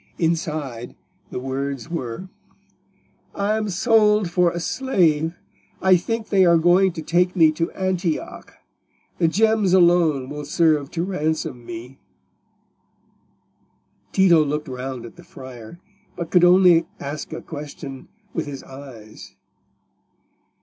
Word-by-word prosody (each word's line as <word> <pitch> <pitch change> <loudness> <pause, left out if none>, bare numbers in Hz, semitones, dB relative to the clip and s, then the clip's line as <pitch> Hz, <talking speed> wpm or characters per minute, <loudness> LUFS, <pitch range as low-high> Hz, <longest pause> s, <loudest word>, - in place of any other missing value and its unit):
Inside, 155 -7 -2 0.3
the - - -6
words 135 0 -4
were— 165 0 -5 1.1
"I 205 +2 0
am 215 -1 -2
sold 210 -1 +3
for 180 -1 +3
a 170 - -4
slave: 165 - +1 0.4
I 190 -1 +5
think 220 +5 -3
they 195 -1 +4
are 170 -2 +5
going 180 +3 +4
to 160 -2 -6
take 180 +3 +1
me 160 -3 +5
to 165 +2 -2
Antioch. 185 -3 -3 0.6
The 165 - +3
gems 215 +1 +2
alone 170 -7 +4
will 150 +1 -6
serve 150 -2 +2
to 165 +1 -3
ransom 160 -8 -2
me." 120 +3 -9 2.1
Tito 175 -5 +5
looked 150 +1 -3
round 130 -1 -6
at 115 - -12
the - - -13
friar, 130 +3 -11 0.4
but 170 -2 -6
could 180 -1 +4
only 175 -2 +6
ask 145 +2 -6
a 160 - -5
question 145 -3 -9 0.3
with 165 - -3
his 140 -2 -7
eyes. 130 -6 -12
165 Hz, 125 wpm, -22 LUFS, 140-180 Hz, 2.1 s, only